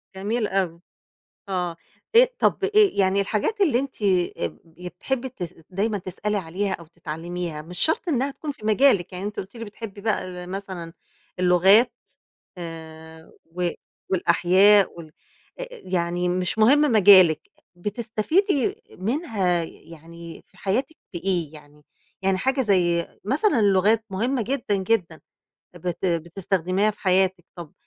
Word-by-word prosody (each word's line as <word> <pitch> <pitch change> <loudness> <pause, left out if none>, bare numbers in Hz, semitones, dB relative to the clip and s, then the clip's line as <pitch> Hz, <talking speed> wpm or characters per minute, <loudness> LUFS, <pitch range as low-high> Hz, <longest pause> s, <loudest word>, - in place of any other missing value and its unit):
جميل 210 +3 -1
أوي، 180 -4 -1 0.7
آه، 180 -3 -2 0.4
آآ - - +8
طَب 390 - +1
آآ 405 - +1
يعني 200 - +4
الحاجات 220 - -1
اللي 290 -11 +3
أنتِ 265 -5 -5
آآ 180 - +1
ب 75 -2 -10 0.2
ي 180 0 -6
بتحبّي 260 +8 -3
تس 180 -10 -7 0.2
دايمًا 205 +3 -1
تسألي 205 +3 -3
عليها 190 +2 -2
أو 170 - -6
تتعلّميها، 165 0 -6
مش 175 +3 -8
شرط 320 +3 +2
إنها 275 -1 +1
تكون 295 +1 -6
في 215 - -17
مجالِك، 210 -6 +3
يعني 180 +2 -5
أنتِ 205 0 -5
قُلتِ 195 +5 -11
لي 230 - -6
بتحبّي 205 -1 -9
بقى 210 -3 -1
ال 180 -1 -8
مثلًا 190 -4 -6 0.5
اللغات 185 +6 +5 0.7
آآ 160 -1 -10
و 175 +1 -2 0.4
والأحياء 190 +3 +4
وال 155 -2 -13 0.5
آآ - - -6
يعني 180 - -2
مش 180 +3 -1
مهم 260 +7 +5
مجالِك 185 -6 +6 0.3
بتستفيدي 235 - -1
منها 200 - -1
ي 160 - -7 0.2
يعني 165 +1 -11
في - - -26
حياتِك 260 +11 -1 0.2
بإيه 175 -3 -2
يعني؟ 150 0 -15 0.4
يعني 190 -1 +1
حاجة 265 +5 0
زي 175 -5 +2 0.2
مثلًا 275 - +2
اللغات 205 +2 +3
مهمّة 235 +6 -1
جدًا، 240 -4 -1
جدًا 190 -5 -1 0.6
بت 175 +2 -4
بتستخدميها 185 +3 0
في 210 - -22
حياتِك، 185 -2 +1
طَب 170 -4 -10
190 Hz, 140 wpm, -24 LUFS, 175-220 Hz, 0.7 s, آآ